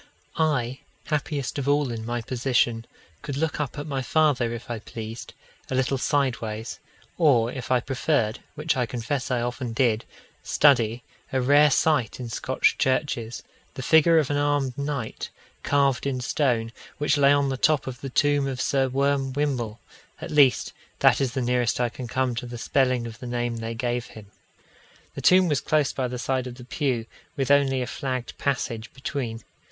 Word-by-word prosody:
I, 135 -5 +1 0.3
happiest 145 -2 -2
of 140 0 -1
all 145 -3 +2
in 110 -1 -5
my 120 0 -2
position, 120 -2 0 0.3
could 140 - -5
look 160 +1 -1
up 145 -1 -3
at 145 - -4
my 140 -3 -2
father, 135 -4 +2
if 120 0 -7
I 120 -2 -4
pleased, 115 +1 -8 0.3
a 130 - -1
little 130 +1 +1
sideways; 115 -6 -1 0.4
or, 125 -8 +4
if 130 -2 -7
I 130 -1 +3
preferred, 130 -3 0 0.2
which 150 +1 0
I 125 -2 0
confess 125 +4 -3
I 125 -2 0
often 120 0 -3
did, 115 -2 +2 0.4
study 120 -5 +3 0.3
a 130 - +1
rare 145 +4 +5
sight 135 -5 +1
in 125 -2 -5
Scotch - - +1
churches 130 -3 -1 0.3
the 130 - -5
figure 160 +3 +5
of 150 -3 +2
an 145 - +1
armed 145 -3 +1
knight, 140 -5 -4 0.3
carved 140 -2 +1
in 130 -2 -1
stone, 125 -3 0 0.3
which 150 0 +2
lay 140 -1 +5
on 140 -1 +3
the 135 - -1
top 150 +2 +2
of 125 -2 -7
the 135 - -5
tomb 145 +1 +2
of 130 -2 -4
Sir 135 +1 +1
Worm 135 0 0
Wymble 130 -6 -2 0.4
at - - -7
least 145 -4 +4 0.2
that - - +4
is 130 -2 0
the 130 - -1
nearest 120 -1 +1
I 120 -1 +1
can 125 +1 -7
come 130 +1 0
to 125 0 -4
the 120 0 -7
spelling 130 0 +1
of 115 0 -8
the 125 - -7
name 120 -1 -2
they 115 0 -4
gave 120 0 -2
him. 105 -2 -13 0.8
The - - -6
tomb 185 0 +5
was 145 -4 +1
close 150 -3 +1
by 130 -2 -1
the 125 0 -5
side 130 0 -1
of 125 - -7
the 125 -1 -12
pew, 125 -3 -1 0.3
with 135 0 0
only 135 -2 +3
a - - -3
flagged 130 -1 -4
passage 120 -4 -2
between. 125 -5 -4
130 Hz, 185 wpm, -25 LUFS, 120-140 Hz, 0.8 s, rare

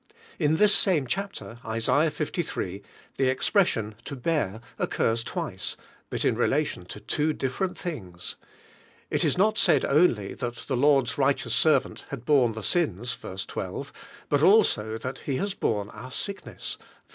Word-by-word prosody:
In 150 +1 +3
this 210 +4 +5
same 170 -9 +3
chapter, 175 -7 -4
Isa. 115 +2 -1
liii., 150 - 0 0.4
the 135 -1 +3
ex 130 - 0
pression, 115 - +2
to 140 - -5
bear, 130 - -1 0.2
occurs 115 0 +1
twice, 115 - -4 0.3
but - - -2
in - - +4
re - - +2
Inlion - - -1
to - - -8
two 155 +1 0
different 150 +9 -2
things. 95 - -6 0.8
It: - - +1
is - - +2
nut 215 +3 +3
said 155 -7 +4
only 140 - +3
flint 120 -1 -4
the 135 - -1
Lord's 135 -1 +3
righteous 140 0 +2
Serv 145 -4 +4
ant - - -11
had 135 -5 -6
home 130 -6 +4
the 110 0 -6
sins 120 - 0
(ver. 95 - -8
12), 95 +8 -5 0.3
but 145 -1 +2
also 115 - +4
thai 130 +3 -4
He 140 - -1
has 200 +7 -1
borne 105 - -1
oar 105 +4 -9
sickness 200 +8 -4
(ver. - - -22
135 Hz, 165 wpm, -27 LUFS, 115-160 Hz, 0.8 s, this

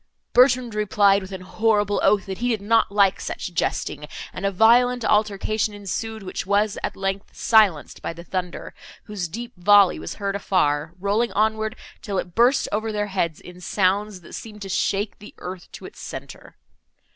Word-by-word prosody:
Bertrand 250 -2 +4
replied, 205 -1 +3
with 190 0 -9
a 190 -1 -7
horrible 205 0 +1
oath, 200 0 +3
that 190 -1 -6
he 245 - 0
did 225 -3 0
not 225 0 +3
like 200 -1 +3
such 180 - -5
jesting, 150 -3 -2 0.3
and 195 - -2
a - - 0
violent 240 +4 +4
altercation 210 0 +1
ensued, 215 +2 -5
which 185 - -4
was, 205 +1 +1
at - - -3
length, 195 +1 -4
silenced 205 -10 +3
by - - -3
the 170 +1 -10
thunder, 180 0 -5 0.3
whose 205 -5 -4
deep 235 +8 -7
volley 200 - +5
was 80 - -6
heard 200 -1 -3
afar, 160 -5 0
rolling 205 +5 +1
onward 220 +1 0 0.3
till 200 -2 -3
it 175 -1 -3
burst 245 +6 +3
over 220 +2 -1
their 210 -1 -2
heads 170 -5 -1
in 180 0 -13
sounds, 195 +1 0
that 170 - -14
seemed 210 -2 -8
to 195 - -7
shake 200 +2 -1
the 210 - -13
earth 180 0 -8
to - - -10
its - - -11
centre. - - -9
205 Hz, 180 wpm, -23 LUFS, 185-220 Hz, 0.3 s, volley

